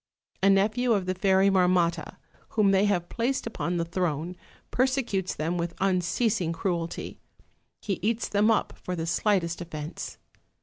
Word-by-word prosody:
A 195 - +5
nephew 220 +5 +3
of 195 -3 0
the 185 - 0
Fairy 190 +1 +3
Marmotta, 180 -3 +2 0.4
whom 205 -2 +5
they 195 +1 +4
have 180 -4 +1
placed 245 +3 -1
upon 180 -6 -2
the 170 - 0
throne, 170 -1 -2 0.4
persecutes 245 -8 0
them 165 +3 -2
with 170 0 -3
unceasing 190 0 +1
cruelty; 170 -1 -3 0.6
he 195 -4 -2
eats 225 +3 0
them 210 +2 +2
up 225 - +1
for 180 - -3
the 165 -1 -3
slightest 170 -1 +1
offence. 155 -2 -6
185 Hz, 145 wpm, -27 LUFS, 170-210 Hz, 0.6 s, A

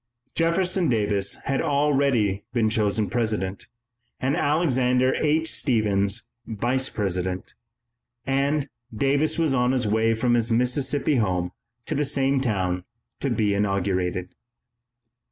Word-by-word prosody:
Jefferson 175 +1 +1
Davis 105 -4 +1
had 135 0 -1
already 140 -9 +1
been 110 -3 +1
chosen 105 -1 +1
President, 105 -5 -2 0.5
and 135 +3 0
Alexander 130 -6 +2
H. 160 +1 +1
Stephens 105 -3 +1 0.2
Vice 120 +4 -1
President, 90 -2 -3 0.7
and 140 +2 0 0.2
Davis 140 +6 +1
was 160 -4 +1
on 125 0 +2
his 125 -3 0
way 110 +2 +2
from 120 +2 +1
his 120 -1 +2
Mississippi 130 +4 +2
home 90 -5 0 0.3
to - - -3
the 150 0 0
same 135 -1 +1
town 95 -7 -1 0.4
to 140 - -1
be 105 -4 +1
inaugurated. 95 -3 -1
120 Hz, 120 wpm, -24 LUFS, 100-140 Hz, 0.7 s, Alexander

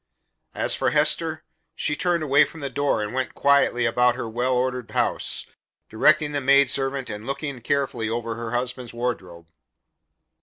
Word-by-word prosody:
As - - +2
for - - +1
Hester, - - +1 0.3
she 150 - -1
turned 175 0 0
away 145 -1 +5
from 165 - -7
the 140 -1 -4
door 140 -4 0
and 105 - -5
went 130 -1 -3
quietly 140 -4 +3
about 125 +1 +3
her 120 -2 -5
well 120 +3 -1
ordered 125 -1 -1
house, - - 0 0.5
directing 150 +6 +3
the 145 -1 -2
maidservant 135 0 +2
and 105 +2 -7
looking 140 -2 -4
carefully 120 -3 -1
over 115 0 -3
her 115 0 -6
husband's 125 0 -4
wardrobe. 95 -9 -4
125 Hz, 155 wpm, -24 LUFS, 120-140 Hz, 0.5 s, away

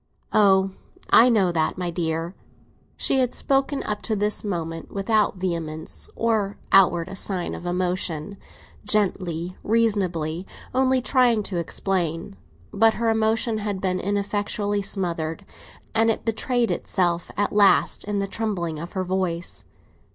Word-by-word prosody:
"Oh, 195 -2 +4 0.4
I 240 +2 +8
know 200 -6 +3
that, 160 0 0
my 180 -1 -2
dear!" 165 0 -2 0.6
She 270 - +1
had 250 -2 0
spoken 275 +1 0
up 210 -1 -3
to 220 - -1
this 210 +1 +1
moment 165 -5 -4
without 210 +1 +1
vehemence 165 -4 -2
or 215 -3 0
outward 185 -1 +4
sign 190 -2 -2
of 175 - -6
emotion, 180 0 -2 0.5
gently, 185 -4 -1
reasoningly, 190 -7 0 0.3
only 260 0 +2
trying 245 -5 +3
to 190 -3 -4
explain. 170 - -2 0.4
But 225 +2 +4
her 230 -1 +1
emotion 220 0 +1
had 205 -2 -3
been 185 -1 -1
ineffectually 205 +1 -1
smothered, 175 -2 -2 0.5
and 225 +1 +3
it 225 - -1
betrayed 235 +1 0
itself 175 -3 0
at 205 0 0
last 205 -1 +4
in 205 0 -2
the 200 - 0
trembling 190 -7 -3
of 170 +2 -7
her 190 -2 -1
voice. 180 -2 -2
195 Hz, 135 wpm, -24 LUFS, 175-215 Hz, 0.6 s, I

